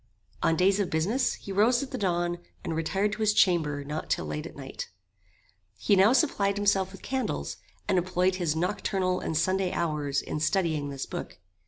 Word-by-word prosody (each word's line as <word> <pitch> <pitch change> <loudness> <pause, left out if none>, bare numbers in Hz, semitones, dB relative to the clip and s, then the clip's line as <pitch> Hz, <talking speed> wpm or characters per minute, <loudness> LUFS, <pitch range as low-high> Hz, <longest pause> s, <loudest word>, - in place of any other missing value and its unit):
On 165 - +3
days 190 +3 +3
of 200 - 0
business, 210 +12 +1
he 200 - -9
rose 230 +6 +3
at 270 - -8
the - - -3
dawn, 175 -3 0 0.2
and 165 - -3
retired 195 +6 0
to 210 - -5
his 215 -1 +3
chamber 155 -8 +3
not 150 +2 -5
till - - 0
late 150 +2 -4
at - - -13
night. 135 -1 -7 0.9
He 200 - +3
now 195 +4 +6
supplied 205 -8 +2
himself 195 -2 +2
with 195 - -13
candles, 210 - -2 0.3
and 185 - +3
employed 185 +1 +1
his 170 -4 0
nocturnal 185 +1 0
and 160 - -2
Sunday 185 +2 +1
hours 150 -4 -1
in - - -3
studying 155 -4 0
this 135 -1 -4
book. - - -6
185 Hz, 185 wpm, -28 LUFS, 160-200 Hz, 0.9 s, now